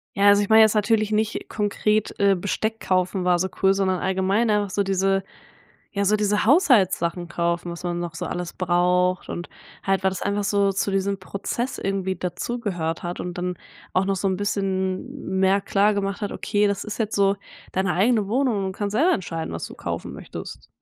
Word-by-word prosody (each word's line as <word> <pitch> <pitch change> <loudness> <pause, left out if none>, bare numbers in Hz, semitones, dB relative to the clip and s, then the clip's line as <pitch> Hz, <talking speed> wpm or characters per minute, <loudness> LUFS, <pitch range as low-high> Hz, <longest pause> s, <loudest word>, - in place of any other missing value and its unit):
Ja, 200 +1 +4
also, 205 0 +6
ich 205 - -2
meine 220 0 +8
jetzt 220 - +4
natürlich 215 0 +2
nicht 215 +1 -1
konkret, 210 0 0
äh, 200 -1 +4
Besteck 215 +4 -2
kaufen 185 0 0
war 180 -1 +4
so 185 - 0
cool, 195 0 +5
sondern 190 -2 0
allgemein 190 +4 +1
auch 205 -1 +1
so 200 +2 0
diese 195 0 +1 0.7
ja, 200 0 0
so 210 +2 +4
diese 210 0 +1
Haushaltssachen 190 - +3
kaufen, 170 0 -1
was 170 - -8
man 175 -1 -2
noch 170 -1 -4
so - - -4
alles 175 -1 -4
braucht 180 +1 +1
und 175 - -5 0.3
halt, 195 -1 0
weil 190 - +3
das 185 - -5
einfach 200 +1 -1
so 200 0 +2
zu 195 +1 -1
diesem 195 0 0
Prozess 200 +6 -4
irgendwie 190 -1 -1
dazugehört 180 -4 -3
hat 175 0 -5
und 180 - -4
dann 180 0 -3 0.4
auch 185 +1 +2
noch 195 0 0
so 195 +1 -1
'n 190 -1 0
bisschen 190 -2 -2
mehr 190 +1 +4
klar 200 +1 +2
gemacht 200 +1 -2
hat: 205 - -2
„Okay, 210 -1 +1
das 200 0 -1
ist 215 +2 -6
jetzt 220 -1 -1
so 200 0 +3 0.4
deine 190 -1 0
eigene 210 +1 +2
Wohnung 245 -1 +1
und 195 - -1
du - - -18
kannst 205 -1 -2
selber 305 +12 +3
entscheiden, 165 -3 -4
was - - -4
du - - -10
kaufen - - -5
möchtest.” - - -9
195 Hz, 200 wpm, -23 LUFS, 185-205 Hz, 0.7 s, meine